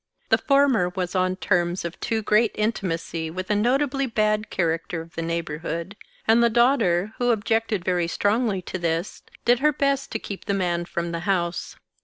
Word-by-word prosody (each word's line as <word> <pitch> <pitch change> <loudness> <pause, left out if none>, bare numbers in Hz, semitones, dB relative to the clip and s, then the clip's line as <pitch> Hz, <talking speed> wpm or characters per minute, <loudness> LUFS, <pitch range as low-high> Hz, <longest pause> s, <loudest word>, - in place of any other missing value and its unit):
The - - +4
former 275 -10 +3
was 180 -1 -3
on 185 -1 +1
terms 175 -2 0
of 170 - -6
too 225 -1 -1
great 215 +2 +3
intimacy 170 -6 -2
with 185 +4 -4
a - - +3
notably 270 +5 +1
bad 215 -2 0
character 165 0 -1
of 165 0 -10
the 165 - -4
neighborhood; 170 +2 -3 0.3
and 225 +2 +5
the 235 - +5
daughter, 220 -5 +2
who 245 0 +2
objected 225 -3 0
very 180 -2 +1
strongly 205 +1 0
to 185 - -5
this, 170 +2 -2 0.2
did 245 0 +4
her 300 +2 +4
best 275 -1 0
to - - +1
keep 200 -3 -8
the 200 - 0
man 175 -2 0
from 170 0 -3
the 170 - -3
house. 175 -2 -1
195 Hz, 180 wpm, -24 LUFS, 170-230 Hz, 0.3 s, and